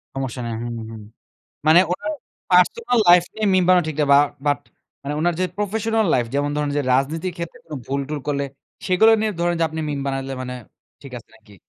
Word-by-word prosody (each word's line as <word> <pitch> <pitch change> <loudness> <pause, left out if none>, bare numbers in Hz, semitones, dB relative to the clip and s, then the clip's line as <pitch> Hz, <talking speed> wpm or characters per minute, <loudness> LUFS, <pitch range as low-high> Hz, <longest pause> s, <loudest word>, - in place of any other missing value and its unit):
সমস্যা 130 -2 -4
নাই। 115 - -4
হুম, 120 0 -5 0.2
হুম। 110 -1 -9 0.7
মানে 160 +3 +7
ওনার 305 +12 -3 0.4
personal 235 - +3
life 175 0 +7
নিয়ে 220 - -2
meme 185 -1 +3
বানানো 180 -2 +5
ঠিক 155 - -5
না। - - +4
বা 140 - +8 0.3
but 145 0 +2 0.4
মানে 140 +1 -4
ওনার 175 +1 +2
যে - - +2
professional 220 +2 0
life 120 -2 0
যেমন 145 +1 0
ধরেন 150 -1 -1
যে 145 - +1
রাজনীতির 160 +7 -1
ক্ষেত্রে 170 -1 -7
কোনো 155 -2 -7
ভুল-টুল 140 +2 -3
করলে 140 -1 0 0.4
সেগুলো 220 +5 +5
নিয়ে 220 -1 0
ধরেন 175 0 +1
যে - - +1
আপনি 160 0 -5
meme 145 -2 -3
বানাইলে 135 0 -3
মানে 125 0 -5 0.5
ঠিক 140 -2 -11
আছে 115 - -19
নাকি? 105 -2 -20
155 Hz, 200 wpm, -21 LUFS, 135-180 Hz, 0.7 s, বা